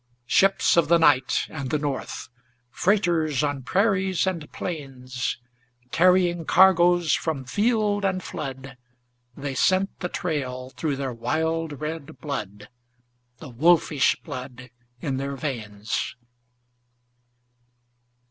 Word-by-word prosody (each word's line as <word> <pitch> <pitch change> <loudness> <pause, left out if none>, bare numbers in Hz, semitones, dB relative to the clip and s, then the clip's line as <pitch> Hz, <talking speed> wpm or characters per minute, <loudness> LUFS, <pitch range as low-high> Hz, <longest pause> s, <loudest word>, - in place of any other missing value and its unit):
Ships 195 +7 +3
of 165 -3 +4
the 170 +2 +5
night 145 -6 +3
and 140 -4 -5
the 150 - +1
north, 145 -2 -4 0.4
Freighters 170 - +1
on 145 -2 -1
prairies 190 - +1
and 170 -5 -3
plains, 130 -6 -4 0.5
Carrying 175 -1 +3
cargoes 175 -1 +5
from 150 -5 -1
field 210 - +1
and 185 -2 0
flood 135 -2 -7 0.6
They 140 -1 -4
scent 185 +8 +2
the 180 - -3
trail 130 -8 -3
through 150 -1 -2
their 135 -2 -3
wild 160 +4 -2
red 160 0 -5
blood, 105 -8 -5 0.7
The 145 - -10
wolfish 155 +2 +3
blood 130 -3 -8 0.3
in 135 -3 -2
their 140 +1 -3
veins. 110 -8 -4
150 Hz, 110 wpm, -25 LUFS, 130-175 Hz, 0.7 s, the